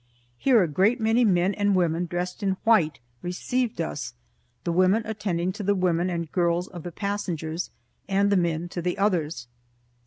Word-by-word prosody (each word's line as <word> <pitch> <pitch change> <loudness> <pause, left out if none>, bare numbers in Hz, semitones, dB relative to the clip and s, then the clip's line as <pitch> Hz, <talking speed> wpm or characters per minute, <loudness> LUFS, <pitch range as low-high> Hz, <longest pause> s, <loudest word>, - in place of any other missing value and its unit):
Here 245 -7 +5
a - - 0
great 195 - +2
many 225 +2 +3
men 185 -2 +3
and 205 -1 +1
women, 175 -1 +1
dressed 180 +3 -4
in 190 -2 0
white, 180 -10 +3 0.2
received 230 +7 -2
us, 130 -6 -4 0.5
the 170 - -1
women 185 +6 +3
attending 195 -5 -1
to 210 - -7
the 200 +1 +2
women 180 -1 +1
and 170 -3 -3
girls 175 0 +1
of 175 -3 -9
the 175 - -6
passengers, 175 -4 -3 0.4
and 200 +1 +2
the - - +4
men 170 -2 0
to 175 - -4
the 180 +1 -1
others. 165 -10 0
180 Hz, 175 wpm, -26 LUFS, 170-205 Hz, 0.5 s, Here